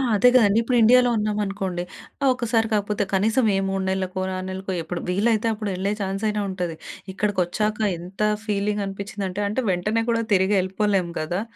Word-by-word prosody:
అదే 225 +5 +5
గదండీ 215 -4 +5
ఇప్పుడు 245 +1 +1
ఇండియాలో 245 +2 +6
ఉన్నామనుకోండి. 200 -4 -2 0.4
ఆహ్, 275 - +5
ఒకసారి 230 -2 +1
కాకపోతే 210 0 0
కనీసం 220 +6 +2
ఏ, - - +2
3 195 0 -1
నెలలకో, 190 0 -2 0.2
6 185 - -5
నెలలకో 190 +1 -5
ఎప్పుడు 170 +2 -5
వీలైతే 215 +4 +1
అప్పుడు 215 -1 -4
వెళ్ళే 190 +2 -1
ఛాన్స్ 195 +1 -3
అయినా 210 0 -1
ఉంటాది. 180 -3 -3 0.4
ఇక్కడికొచ్చాక 205 +2 -1 0.2
ఎంత 180 +4 -9 0.2
ఫీలింగ్ 205 0 -1
అనిపిచ్చిందంటే, 195 0 -4
అంటే 215 +6 -1
వెంటనే 210 +5 0
కూడా 230 -1 +2
తిరిగి 190 +1 +3
వెళ్ళిపోలేము 190 -1 0
గదా! 175 +5 -2
200 Hz, 160 wpm, -23 LUFS, 190-215 Hz, 0.4 s, ఇండియాలో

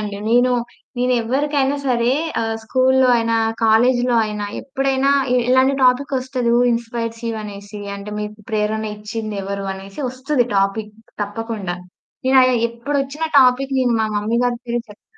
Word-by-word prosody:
అండి. 205 -1 -5
నేను, 245 +1 +4 0.5
నేనెవ్వరికైనా 265 +3 +1
ఆహ్, - - -8
సరే 240 0 +2 0.5
స్కూల్‌లో 260 +2 +3
అయినా, 230 0 +1 0.3
కాలేజ్‌లో 245 +2 +3
అయినా, 210 -1 -4
ఎప్పుడైనా 270 0 0 0.2
ఇ - - +3
ఇలాంటి 260 +2 +4
టాపిక్కొస్తది 255 -1 +1
హూ 240 - +4
ఇన్‌స్పైర్స్ 230 -1 -3
యూ - - -1
అనేసి. 205 0 -9 0.2
అంటే, 200 +1 -8
మీకు 210 0 -5
ప్రేరణ 215 0 -1
ఇచ్చింది 215 0 -5
ఎవరు? 200 0 -4
అనేసి 195 +5 -9
ఒస్తది. 260 -1 0
టాపిక్ 205 +2 0 0.3
తప్పకుండా. 205 -3 -4 0.5
నేనయా 260 -1 +5 0.2
ఎప్పుడొచ్చినా 275 +5 -2
టాపిక్, 265 +1 +3
నేను 245 -2 +2
మా 220 - +1
మమ్మీ 220 +3 0
గారి 245 -1 0
పేరే 240 0 -2
చెప్తా. 210 - -16
235 Hz, 140 wpm, -20 LUFS, 215-260 Hz, 0.5 s, నేనయా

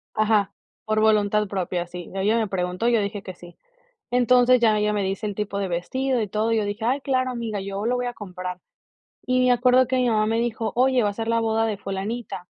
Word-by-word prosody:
Ajá, 215 -2 +2 0.3
por 215 0 0
voluntad 210 -1 +2
propia, 180 -2 -2
sí, 175 0 -9
ella 205 +4 +1
me 225 -2 +1
preguntó 180 +3 -2
y 240 - +3
yo 230 - +3
dije 205 0 -3
que 185 -2 -8
sí, 175 0 -14 0.5
entonces, 250 0 +4
ya 220 -2 +3
ella 210 0 +1
me 205 -1 0
dice 195 +3 -2
el 205 - -3
tipo 200 -1 -3
de 200 - -1
vestido 250 +9 -1
y 210 - -3
todo, 215 +3 0
y 225 - +2
yo 210 - 0
dije: 205 +2 -4
"Ay, 260 +4 +1
claro, 255 -2 0
amiga, 230 -4 -4
yo 195 +2 -4
lo 250 +2 +1
voy 245 0 -2
a 245 - -3
comprar". 180 -2 -7 0.7
Y 255 0 +2
me 255 - +3
acuerdo 250 +1 +4
que 260 - 0
mi 250 -1 +2
mamá 215 -1 +2
me 225 +1 0
dijo: 230 -2 -2
"Oye, 255 -1 +3
va 205 - +2
a - - -2
ser 225 +2 -5
la 230 0 +2
boda 225 0 +1
de 215 -2 -2
fulanita". 195 0 -5
215 Hz, 245 wpm, -24 LUFS, 200-240 Hz, 0.7 s, entonces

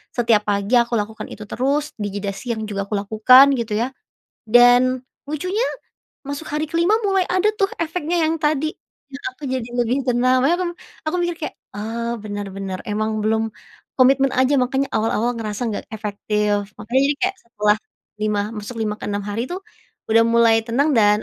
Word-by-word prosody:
setiap 225 -3 +3
pagi 200 +4 +1
aku 235 0 0
lakukan 215 +1 -5
itu 210 - -8
terus 285 +4 0
di 205 - -1
jeda 200 0 -3
siang 235 -2 -4
juga 200 -1 -2
aku 210 - -2
lakukan 250 +7 +6
gitu 220 -2 -3
ya, 235 +3 +1 0.6
dan, 245 +2 +5 0.2
lucunya 365 - -1 0.7
masuk 285 +2 -4
hari 300 +1 -1
ke-5 340 +6 +3
mulai 385 -2 +3
ada 370 +4 +3
tuh 390 - +3
efeknya 335 +1 -1
yang 320 +1 +1
tadi, 310 0 +1 0.4
yang 275 - -8
aku - - -17
jadi 260 -2 -1 0.2
lebih 245 +3 +1
tenang 255 +1 +3
makanya 330 +6 +3
aku - - -1 0.4
aku 310 - 0
mikir 345 -1 -1
kayak, - - -12 0.2
"Oh, 230 +3 -3
bener 205 -1 -4
bener 195 -1 -4
emang 215 +1 -1
belum, 220 +1 +1 0.5
komitmen 270 +1 +5
aja 260 +2 +3
makanya 270 +2 0
awal-awal 225 +2 +1
ngerasa 215 +1 -3
enggak - - -5
efektif." 210 -1 -1
makanya 235 +5 +1
jadi 290 +1 +1
kayak 385 +1 +1
setelah 210 -2 +1 0.4
lima 210 -1 +1 0.2
masuk 210 +4 -7
5 215 -1 -1
ke - - -6
6 205 0 -2
hari 205 +3 -2
tuh, 365 - -3 0.5
udah 225 +1 +6
mulai 230 0 +4
tenang 275 +6 +2
dan 210 -1 +5
235 Hz, 175 wpm, -21 LUFS, 210-280 Hz, 0.7 s, lakukan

